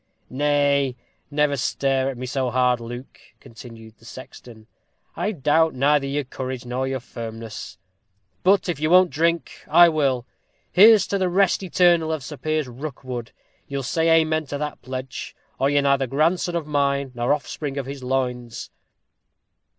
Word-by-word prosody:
"Nay, 140 -1 +1 0.3
never 150 -1 +1
stare 135 +1 0
at 135 - -6
me 130 - -5
so 130 0 -1
hard, 125 0 +2
Luke," 120 +2 -9 0.2
continued 115 -1 -13
the 115 - -20
sexton; 120 -2 -12 0.5
"I 210 - -1
doubt 160 -2 +2
neither 140 +1 +2
your 145 +1 -1
courage 130 -1 -6
nor 125 +2 -2
your 135 0 -2
firmness. 115 -2 -8 0.6
But 195 +1 +3
if 170 -5 -2
you 155 +1 0
won't 180 0 +5
drink, 170 +2 -1
I 170 +2 +7
will. 135 -6 0 0.5
Here's 215 +2 +7
to 200 - -2
the 185 -1 +1
rest 195 +2 +2
eternal 175 -3 +3
of 155 -4 -3
Sir 150 +3 -8
Piers 155 -1 -1
Rookwood! 125 -2 -7 0.4
You'll 140 -1 -4
say 160 +5 +1
amen 155 -1 -1
to 145 - -4
that 150 0 -5
pledge, 130 0 -6 0.2
or 135 - +2
you 145 - +1
are - - +5
neither 140 -1 +2
grandson 165 +6 +1
of 165 -3 -2
mine, 140 -2 0
nor 120 +1 -1
offspring 145 0 -3
of 140 - -3
his 140 0 -7
loins." 125 -2 -3
140 Hz, 160 wpm, -23 LUFS, 125-155 Hz, 0.6 s, I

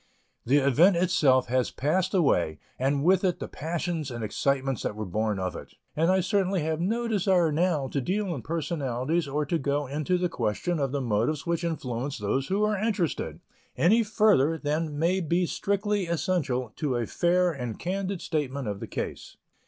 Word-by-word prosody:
The 135 +4 +5
event 145 +7 +5
itself 150 -8 +3
has 130 0 +1
passed 185 +7 0
away 90 - +2 0.2
and 140 +2 +1
with 185 +3 +4
it 180 -3 +1
the - - -5
passions 165 -1 -3
and 120 -2 -5
excitements 135 +3 0
that - - -3
were 110 0 -4
born 105 +3 -1
of 90 -2 -3
it; - - -10 0.2
and 165 +3 +2
I 190 0 +4
certainly 190 -2 +1
have 160 +1 -1
no 230 +6 0
desire 190 -6 +2
now 155 -3 +1
to 140 - -1
deal 190 +5 -1
in 135 - -5
personalities 150 0 -1
or 145 +2 -1
to 165 +3 0
go 145 +1 0
into 150 +6 -1
the 180 0 +1
question 140 - -2
of 135 -2 0
the 140 0 -1
motives 120 +5 0
which 170 0 -1
influenced 140 -5 -3
those 130 +7 -1
who 195 +5 0
were 210 0 +2
interested, 205 - -1 0.4
any 215 +8 +4
farther 205 -8 +3
than 150 0 -2
may 170 +5 +2
be 175 +1 +1
strictly 200 +1 -1
essential 145 - -1
to 140 -5 -1
a 120 -1 0
fair 175 +6 +2
and 125 -7 -5
candid 190 +1 -3
statement 140 -4 -2
of 100 -1 -3
the - - -6
case. - - -6
155 Hz, 185 wpm, -27 LUFS, 135-180 Hz, 0.4 s, The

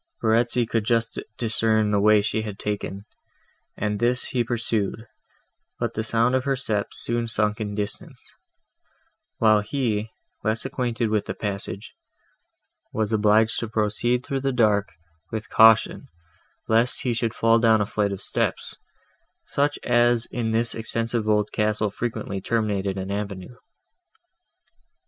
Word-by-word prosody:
Verezzi 120 +2 +2
could 115 -1 0
just 115 0 0 0.2
discern 110 -2 +2
the 100 - +2
way 105 0 +5
she 110 +1 -1
had 105 -2 -6
taken, 100 -1 -4 0.7
and 105 0 -2
this 125 +1 +1
he 125 -2 0
pursued; 115 -2 0 0.7
but - - -2
the 110 - -2
sound 115 +2 +1
of 130 -1 +1
her 135 0 0
steps 110 -6 -3
soon 120 0 0
sunk 105 -1 0
in 105 -1 -4
distance, 105 0 -5 1.0
while 110 -2 +4
he, 110 -2 -2 0.3
less 110 +3 -1
acquainted 120 -4 -2
with 105 -2 0
the - - -4
passage, 100 0 -5 1.0
was 110 0 -1
obliged 110 +1 +3
to 115 - -3
proceed 110 +3 0
through 135 -2 -2
the 135 0 0
dark, 105 -5 +2 0.4
with 110 -3 -5
caution, 110 +5 +5 0.6
lest 115 +2 +3
he 125 - 0
should 115 -1 -2
fall 115 0 +3
down 110 -1 +4
a 105 - +1
flight 100 0 -1
of 100 0 -6
steps, - - -1 0.7
such 145 +1 0
as 120 0 +3
in 115 -2 -2
this 115 +1 +1
extensive 115 0 -2
old 105 -1 +2
castle 105 -1 0
frequently 110 -3 -4
terminated 100 -3 -1
an 95 +1 -4
avenue. 100 +2 -5
110 Hz, 140 wpm, -24 LUFS, 105-120 Hz, 1.0 s, way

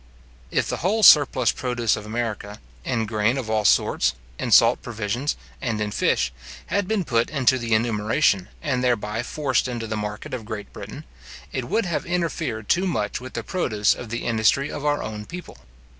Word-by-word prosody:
If - - 0
the - - -2
whole 210 +6 0
surplus 135 - +7
produce 120 -3 0
of 105 - -8
America, 110 -2 -4 0.2
in 115 - -1
grain 110 +3 +1
of 115 -5 -3
all 110 -1 +1
sorts, - - +3 0.2
in - - -2
salt - - +6
provisions, 120 +5 -2 0.3
and 115 -4 -1
in 105 -1 -2
fish, 60 -9 +1 0.4
had 200 -2 +1
been 215 -2 0
put 120 -6 +1
into 130 -3 +2
the 115 -2 +1
enumeration, 110 -2 +1 0.2
and 130 -5 0
thereby 115 -3 0
forced 130 0 0
into 120 -2 -4
the 110 0 -3
market 105 +2 -5
of 125 -3 -4
Great 105 -2 -7
Britain, - - -8 0.5
it 130 - -3
would 225 - 0
have 170 -1 -2
interfered 165 - -2
too 185 +3 +2
much 105 - -2
with 130 0 -9
the - - -4
produce 110 - +1
of 120 - -8
the 120 +1 -4
industry 115 +5 +2
of 145 - -6
our 145 0 +1
own 105 -1 -6
people. 180 +1 -9
120 Hz, 185 wpm, -23 LUFS, 110-140 Hz, 0.5 s, surplus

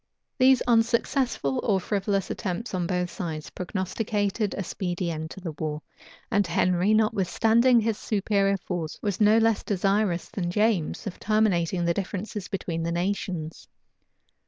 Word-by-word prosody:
These 260 0 +5
unsuccessful 235 - +1
or 200 -3 +2
frivolous 195 0 -1
attempts 210 +3 -4
on 180 -2 -1
both 180 -1 -1
sides 160 -4 -5
prognosticated 205 +3 -2
a 200 - -2
speedy 175 -2 -3
end 160 0 -5
to 190 - -9
the 175 -3 -5
war; 155 -1 -3 0.5
and 205 -2 +2
Henry, 180 +3 +2
notwithstanding 220 +3 +3
his 220 -1 -1
superior 200 -1 +1
force, 175 -3 -4
was 205 0 -1
no 210 +1 +6
less 225 -1 +3
desirous 195 -2 0
than 190 -6 -3
James 210 -1 0
of 200 - -6
terminating 185 -5 +1
the 170 - +2
differences 200 +1 -4
between 175 -4 -3
the 165 +1 -1
nations. 175 -2 -3
195 Hz, 140 wpm, -26 LUFS, 175-215 Hz, 0.5 s, no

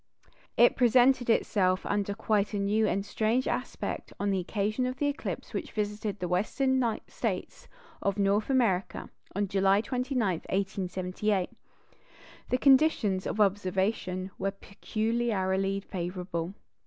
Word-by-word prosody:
It 240 - +6
presented 250 0 +4
itself 185 -4 +2
under 205 0 -1
quite 210 0 0
a - - 0
new 210 +2 +2
and 195 0 -1
strange 225 +5 0
aspect 250 - -3
on 205 0 0
the 190 - +1
occasion 215 +6 -1
of 255 - -3
the 290 - 0
eclipse 285 +2 -3
which - - -4
visited 210 0 -2
the 180 - -3
Western 260 +9 +1 0.3
States - - -4 0.3
of 200 0 0
North 200 +3 +1
America, 225 -9 0 0.3
July 195 0 +3
29, 250 -1 -1
1878. 185 +1 -1 1.0
The 250 - +2
conditions 260 -9 +3
of 215 - -3
observation 190 -1 0
were 195 - 0
peculiarly 195 -1 -1
favourable. 180 -1 -4
205 Hz, 120 wpm, -29 LUFS, 190-230 Hz, 1.0 s, It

